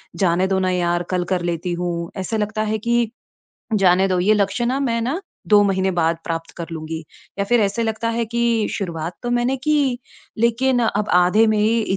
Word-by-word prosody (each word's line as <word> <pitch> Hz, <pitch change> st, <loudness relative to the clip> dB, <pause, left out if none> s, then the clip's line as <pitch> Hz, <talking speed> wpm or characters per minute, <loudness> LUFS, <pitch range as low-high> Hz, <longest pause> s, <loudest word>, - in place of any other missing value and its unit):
जाने 185 Hz, -1 st, +2 dB
दो 190 Hz, 0 st, +1 dB
न 190 Hz, -, 0 dB
यार, 175 Hz, -1 st, 0 dB
कल 180 Hz, -1 st, +1 dB
कर 180 Hz, -, 0 dB
लेती 170 Hz, +1 st, -3 dB
हूँ। 170 Hz, -1 st, -3 dB
ऐसे 190 Hz, +4 st, -2 dB
लगता 215 Hz, +1 st, -1 dB
है -, -, +1 dB
कि 235 Hz, -1 st, +2 dB, 0.6 s
जाने 190 Hz, -1 st, +4 dB
दो 185 Hz, -1 st, +1 dB
ये 210 Hz, +4 st, +4 dB
लक्ष्य 205 Hz, +3 st, 0 dB
न, 265 Hz, +3 st, 0 dB
मैं 230 Hz, -3 st, 0 dB
ना 275 Hz, +11 st, -2 dB, 0.3 s
2 210 Hz, -1 st, +6 dB
महीने 190 Hz, -1 st, +1 dB
बाद 170 Hz, -2 st, +1 dB
प्राप्त 165 Hz, 0 st, -4 dB
कर 170 Hz, -, -5 dB
लूँगी 160 Hz, 0 st, -5 dB, 0.4 s
या 200 Hz, -, +1 dB
फ़िर 240 Hz, +3 st, +3 dB
ऐसे 205 Hz, +3 st, 0 dB
लगता 225 Hz, 0 st, -1 dB
है 230 Hz, 0 st, -1 dB
कि 235 Hz, -1 st, +1 dB
शुरुआत 170 Hz, -3 st, -4 dB
तो 240 Hz, -, -2 dB
मैंने 245 Hz, +2 st, +1 dB
की 290 Hz, -5 st, +2 dB, 0.4 s
लेकिन 245 Hz, +2 st, +2 dB
अब 210 Hz, -2 st, 0 dB
आधे 180 Hz, +5 st, +5 dB
में 215 Hz, -1 st, +2 dB
इ 225 Hz, +2 st, +2 dB
210 Hz, 200 wpm, -21 LUFS, 180-235 Hz, 0.6 s, 2